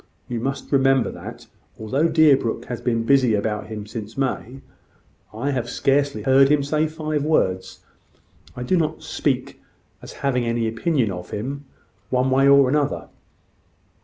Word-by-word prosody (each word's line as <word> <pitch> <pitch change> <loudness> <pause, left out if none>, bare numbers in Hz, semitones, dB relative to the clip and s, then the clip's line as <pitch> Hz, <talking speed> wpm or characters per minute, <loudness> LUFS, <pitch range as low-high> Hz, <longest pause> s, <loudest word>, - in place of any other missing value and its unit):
You 120 -1 -3
must 135 +4 -4
remember 135 -2 +3
that, - - -10 0.3
though 110 - -8
all 140 +9 +1
Deerbrook 140 -8 +3
has 120 -1 -6
been 115 -2 0
busy 130 -3 +3
about 105 0 -2
him 105 -2 -6
since 110 +1 -8
May, 135 -1 -3 0.7
I 125 +7 -2
have 125 -3 -2
scarcely 140 +2 0
heard 135 0 +5
him 145 -1 +3
say 155 +2 0
five 155 -2 -3
words. 95 -11 0 0.7
I 125 - -5
do 180 +9 +1
not 160 -3 -1
speak - - -2 0.4
as - - -10
having 125 -3 +1
any 115 -1 -1
opinion 115 - 0
of 90 -1 -7
him, 140 +7 -5 0.4
one 130 +1 +1
way 135 +1 +4
or 140 -1 +6
another. 145 +1 -1
130 Hz, 155 wpm, -22 LUFS, 115-140 Hz, 0.7 s, or